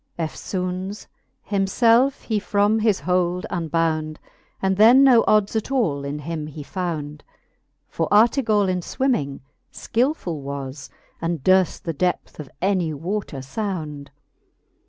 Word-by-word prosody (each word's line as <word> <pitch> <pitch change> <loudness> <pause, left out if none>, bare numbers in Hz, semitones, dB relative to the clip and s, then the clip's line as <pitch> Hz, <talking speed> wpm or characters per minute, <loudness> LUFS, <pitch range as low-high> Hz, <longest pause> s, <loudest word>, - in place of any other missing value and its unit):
Eftfoones 185 +4 -4 0.4
himfelfe 230 +7 +2
he 220 -2 -1
from 205 +2 +1
his 215 -3 +1
hold 180 0 0
unbownd. 160 -2 -1 0.4
And 190 0 +1
then 235 +6 +7
no 250 -4 +6
ods 210 0 +3
at 220 - -1
all 165 - 0
in 140 +1 -4
him 155 +1 -5
he 150 0 -8
fownd: 155 -4 -4 0.7
For 165 - -2
Artegall 215 -1 +4
in 185 -1 0
fwimming 175 - -1 0.3
skilfuU 230 - -1
was. 140 0 -6 0.3
And 165 -4 -2
durft 185 -1 +3
the 165 - -3
depth 180 +2 -2
of 145 -3 -7
any 185 -5 +1
water 170 -2 -4
fownd. 150 -2 -5
180 Hz, 125 wpm, -22 LUFS, 155-210 Hz, 0.7 s, then